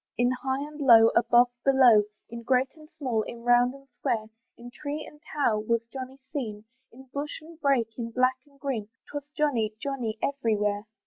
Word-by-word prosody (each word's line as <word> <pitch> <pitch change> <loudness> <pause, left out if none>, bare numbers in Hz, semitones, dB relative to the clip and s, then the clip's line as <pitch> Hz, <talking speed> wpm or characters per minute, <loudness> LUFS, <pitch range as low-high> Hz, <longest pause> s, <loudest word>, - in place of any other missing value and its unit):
In 245 +1 +3
high 265 +2 -2
and 300 0 -12
low, 230 -4 +8
above, 240 +1 +4
below, 250 -6 +6 0.2
In 235 0 -8
great 255 +2 +1
and 305 -1 -16
small, 245 -6 0
in 235 +2 -8
round 245 +1 +4
and 275 0 -16
square, 240 -4 -3 0.3
In 240 +1 -11
tree 295 +3 -5
and 300 - -15
tower 240 -10 0
was 230 +2 0
Johnny 265 0 -6 0.2
seen, 220 -7 -4 0.3
In 260 +3 -14
bush 290 +1 -4
and 320 +1 -15
brake, 250 -5 +1
in 230 -1 -3
black 255 +2 +2
and 280 -1 -25
green, 240 -8 -3 0.2
'Twas 290 0 -6
Johnny, 235 -8 +1
Johnny, 245 -6 -3
every 270 -6 +1
where. 205 +1 -1
250 Hz, 185 wpm, -27 LUFS, 230-275 Hz, 0.3 s, low